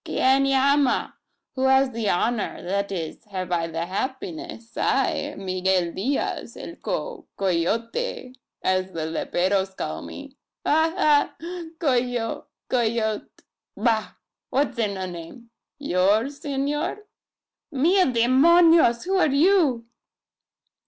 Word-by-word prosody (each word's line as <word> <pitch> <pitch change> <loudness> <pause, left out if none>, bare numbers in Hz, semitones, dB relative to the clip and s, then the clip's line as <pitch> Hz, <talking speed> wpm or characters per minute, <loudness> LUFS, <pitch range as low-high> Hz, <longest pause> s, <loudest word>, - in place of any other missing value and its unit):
"Quien 270 +1 +2
llama! 275 0 +2 0.4
Who 260 0 -1
has 265 0 +4
the 225 -3 -2
honour 225 +5 -1
that 200 +2 -2
is, 165 -1 -5
have 185 -3 -5
I 170 -1 0
the 165 0 -3
happiness 265 - -5
I, 270 +2 0
Miguel 185 -2 0
Diaz 260 +9 -2
el - - -8
Co - - -4
coyote, 230 - -1 0.3
as 185 0 0
the 160 -1 -3
leperos 190 +4 -1
call 80 +1 -4
me. 280 -1 -10 0.3
Ha, 320 +2 +3
ha! 300 -6 +3 0.4
coyo 245 -6 -1 0.2
coyot. 225 -3 0 0.5
Bah! 220 -3 0 0.4
what's 265 -3 0
in 205 -3 0
a 190 - -3
name? 180 +7 -10 0.3
Yours, 220 +2 +1
S'nor? 295 +5 -2 0.7
Mil 345 +7 +3
demonios! 265 +3 +5
who 385 +1 +1
are - - +4
you?" 285 -5 +3
240 Hz, 110 wpm, -24 LUFS, 190-280 Hz, 0.7 s, demonios